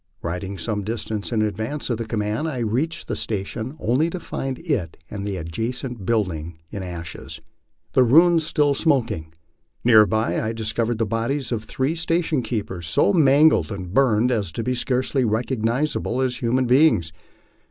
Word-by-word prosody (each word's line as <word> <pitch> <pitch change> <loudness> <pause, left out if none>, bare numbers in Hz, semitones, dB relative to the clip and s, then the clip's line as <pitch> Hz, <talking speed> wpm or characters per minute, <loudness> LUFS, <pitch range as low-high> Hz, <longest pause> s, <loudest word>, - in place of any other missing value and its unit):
Riding 90 +3 -4
some 105 +4 -2
distance 110 0 -3
in 110 -2 +2
advance 110 +8 -2
of 120 - -1
the 115 - -3
command, 110 +6 -1
I 145 -5 -3
reached 135 +10 -1
the - - -2
station 110 +6 -4
only 130 +9 +1
to 185 - -5
find 135 -5 -4
it 130 - -2
and 100 -1 -4
the 100 -2 -3
adjacent 115 - -4
buildings 85 -8 -1
in 100 - -5
ashes, 85 -3 -7 0.5
the - - +5
ruins 165 +7 +5
still 150 -2 +2
smoking. 125 - 0 0.5
Near 110 -3 +7
by 110 +1 0
I 110 0 -2
discovered 115 +1 -1
the 115 - +1
bodies 115 +5 -2
of 115 -3 -1
the 110 - -17
three 130 +4 -1
station 165 -3 0
keepers, 100 -8 -4
so 85 - +3
mangled 150 -4 +5
and 95 -3 -6
burned 125 -2 +3
as 105 -8 -1
to 115 - -3
be 125 - 0
scarcely 130 +2 0
recognizable 120 +5 0
as 125 -1 -1
human 125 +2 +1
beings. 120 - +4
115 Hz, 165 wpm, -23 LUFS, 105-135 Hz, 0.5 s, Near